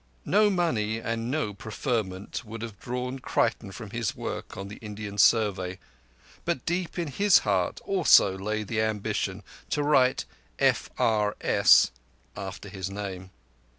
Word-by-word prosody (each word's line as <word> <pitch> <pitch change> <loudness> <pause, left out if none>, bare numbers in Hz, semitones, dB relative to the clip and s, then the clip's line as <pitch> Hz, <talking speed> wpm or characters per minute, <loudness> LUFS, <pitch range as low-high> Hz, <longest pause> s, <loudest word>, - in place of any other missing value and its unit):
No 210 +1 +4
money 120 - 0
and 115 +1 -3
no 140 -7 -1
preferment 105 -2 -3
would 115 0 -8
have 110 -4 -7
drawn 125 +1 -4
Creighton 115 -4 0
from 105 +1 -9
his 115 -2 -2
work - - -6
on 100 - -5
the 105 - -9
Indian 105 -1 -7
Survey, 95 -5 +3 0.7
but 130 - -2
deep 175 +1 -2
in 170 -2 -1
his 200 +7 +5
heart 95 -4 +1
also 175 - +5
lay 105 +3 -2
the 110 +1 -1
ambition 105 -2 -2 0.3
to 145 - 0
write 130 -3 +3 0.3
"F - - +2
R 105 -2 +2
S" - - +5 0.4
after 100 +1 -7
his 95 -1 -5
name. 95 -2 -6
110 Hz, 145 wpm, -27 LUFS, 100-125 Hz, 0.7 s, his